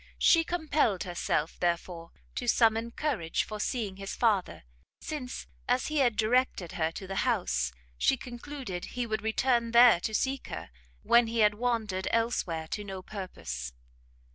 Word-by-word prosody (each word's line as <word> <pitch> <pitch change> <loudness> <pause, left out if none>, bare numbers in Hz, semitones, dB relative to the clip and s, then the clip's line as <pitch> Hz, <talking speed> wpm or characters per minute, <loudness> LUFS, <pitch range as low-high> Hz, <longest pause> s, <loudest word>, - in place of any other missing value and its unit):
She 330 -1 +5
compelled 310 - 0
herself, 170 -3 -2
therefore, 170 -1 -2 0.2
to 245 - -4
summon 225 0 +3
courage 235 - -1
for 215 -1 -7
seeing 210 -4 -2
his 195 0 -5
father, 210 - +1 0.4
since, 270 -5 -5 0.2
as 250 +3 +1
he 305 - -1
had 245 -5 +3
directed 220 -6 +1
her 160 -1 -1
to 190 - -7
the 195 +1 -5
house, 225 - +1 0.3
she 270 - +3
concluded 245 -6 -6
he 245 - 0
would 215 -2 -2
return 235 +2 +1
there 235 -5 +8
to 220 +4 -2
seek 270 +3 -1
her, - - -7 0.3
when 235 0 +5
he 230 0 0
had 210 -1 +5
wandered 220 -4 -1
elsewhere 205 -9 0
to 210 - -3
no 190 -2 -7
purpose. 65 - -6
220 Hz, 155 wpm, -29 LUFS, 185-245 Hz, 0.4 s, there